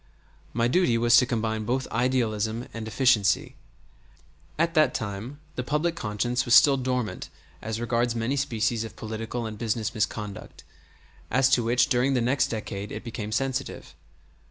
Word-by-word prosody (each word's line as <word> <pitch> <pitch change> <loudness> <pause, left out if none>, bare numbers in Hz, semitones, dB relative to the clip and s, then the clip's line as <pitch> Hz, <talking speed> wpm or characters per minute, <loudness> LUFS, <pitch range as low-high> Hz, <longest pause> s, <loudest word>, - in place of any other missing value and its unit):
My 115 +1 +1
duty 125 -4 +2
was 120 0 +4
to 125 - +4
combine 110 -2 -1
both 125 +4 -1
idealism 115 -1 0
and 115 -1 -6
efficiency. 110 -6 +2 1.0
At 165 +1 +1
that 155 -2 +3
time 110 +7 -5
the - - -3
public 150 +5 0
conscience 120 +1 -1
was 120 -2 +4
still 140 -2 +7
dormant 125 -3 -2 0.3
as 110 +1 -4
regards 120 0 0
many 115 +4 -1
species 115 -4 0
of 115 - -8
political 115 +2 -5
and 110 -1 -6
business 110 -1 -1
misconduct, 105 -2 -4 0.7
as 135 +2 +3
to 130 -2 +4
which 120 +2 +3
during 125 +2 +2
the - - +2
next 125 +4 +2
decade 105 -2 -5
it 110 - -6
became 110 -3 -5
sensitive. 135 +3 -3
120 Hz, 155 wpm, -26 LUFS, 110-130 Hz, 1.0 s, still